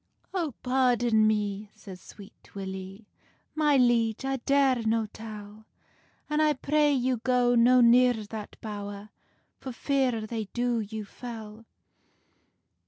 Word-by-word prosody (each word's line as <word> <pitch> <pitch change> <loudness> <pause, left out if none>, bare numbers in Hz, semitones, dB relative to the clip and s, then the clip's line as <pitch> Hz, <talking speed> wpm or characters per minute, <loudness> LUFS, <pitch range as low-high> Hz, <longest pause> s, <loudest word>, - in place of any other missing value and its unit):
"Oh, 335 -9 -2
pardon 245 -4 +2
me," 210 -1 -1
says 185 -2 -11
Sweet 205 0 -16
Willie, 190 +2 -7 0.5
"My 300 -2 +3
liege, 240 -1 +2
I 270 0 -1
dare 270 -1 +2
no 225 0 +1
tell; 215 0 -11 0.6
An 300 0 0
I 305 -1 +3
pray 295 +2 +1
you 255 -2 +1
go 245 +1 +2
no 245 +1 +5
near 245 +1 +6
that 215 -1 -8
bowr, 205 -1 -7 0.5
For 265 - -7
fear 255 -2 0
they 220 -1 -4
do 240 -1 0
you 215 0 -5
fell." 225 0 -9
230 Hz, 125 wpm, -27 LUFS, 215-255 Hz, 0.6 s, near